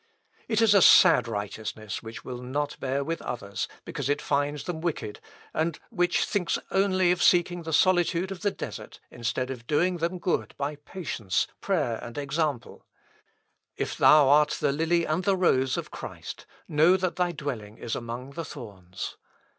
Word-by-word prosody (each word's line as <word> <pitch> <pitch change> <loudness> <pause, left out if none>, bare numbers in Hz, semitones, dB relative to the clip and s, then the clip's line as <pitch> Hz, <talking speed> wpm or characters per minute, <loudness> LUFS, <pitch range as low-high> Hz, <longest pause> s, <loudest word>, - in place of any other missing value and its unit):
It - - +1
is 215 -2 +6
a 200 - +6
sad 125 -7 +7
righteousness 105 0 -5
which 110 0 -9
will 125 -1 -6
not 140 +4 -2
bear 135 +1 -1
with 165 +3 -3
others, 100 -4 -4 0.2
because 150 -5 -4
it 145 +1 +1
finds 145 0 -1
them 165 -3 -4
wicked, 135 -11 -3 0.3
and 160 0 0
which 175 -5 +2
thinks 180 -5 0
only 190 -2 +3
of 180 - 0
seeking 175 0 +3
the 165 -1 -6
solitude 175 +2 +3
of 185 -3 -6
the 205 - +2
desert, - - -8
instead 125 +2 -2
of 120 -3 -8
doing 175 +4 +2
them 170 +2 -1
good 175 0 -1
by 145 +1 -3
patience, 145 - -2
prayer, 145 - 0
and 120 +2 -8
example. 145 -2 -2 0.9
If - - -2
thou 150 -2 +6
art 150 +2 +4
the 145 - +2
lily 165 +3 +1
and 155 +4 -1
the 195 -1 +2
rose 130 -8 +2
of - - -5
Christ, - - -8 0.2
know 160 +5 +4
that 185 -1 -2
thy 180 -1 +1
dwelling 115 -10 -6
is 115 - -4
among 120 +3 -6
the 165 +3 -5
thorns. 95 - -8
150 Hz, 170 wpm, -27 LUFS, 125-175 Hz, 0.9 s, sad